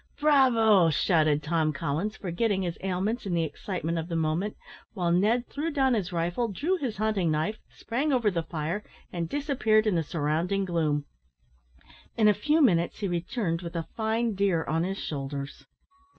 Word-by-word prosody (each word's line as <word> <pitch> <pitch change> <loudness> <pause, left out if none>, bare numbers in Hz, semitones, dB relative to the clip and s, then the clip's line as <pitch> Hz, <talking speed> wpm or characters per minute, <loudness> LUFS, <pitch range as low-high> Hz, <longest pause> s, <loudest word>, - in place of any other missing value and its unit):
"Bravo!" 230 - +5
shouted 155 -2 +2
Tom 155 0 +1
Collins, 165 +7 -2
forgetting 195 +2 -1
his 170 -2 -2
ailments 195 +5 -2
in 180 - 0
the 165 - +2
excitement 165 +2 -3
of 165 - -4
the 170 - -3
moment, 165 +6 -1 0.4
while 175 -5 0
Ned 220 +8 +2
threw 305 +3 -3
down 270 -4 +2
his 195 -6 -1
rifle, 175 +7 -1
drew 290 - -1
his 250 - -4
hunting 210 -5 +1
knife, 160 +8 -1
sprang 275 +6 -2
over 235 -6 +2
the 170 -2 -1
fire, 165 +5 -3 0.3
and 170 -2 -3
disappeared 250 -7 +2
in 215 - +2
the 170 - +2
surrounding 165 +5 -1
gloom. 155 -5 0 1.1
In 220 -2 +5
a 210 - +6
few 300 +9 +2
minutes 170 -8 +2
he 205 - -2
returned 175 0 -2
with 170 -1 -7
a 165 -1 -2
fine 225 +1 0
deer 190 -4 +1
on 160 +1 0
his 190 +2 -2
shoulders. 140 -3 -5
185 Hz, 170 wpm, -27 LUFS, 165-220 Hz, 1.1 s, a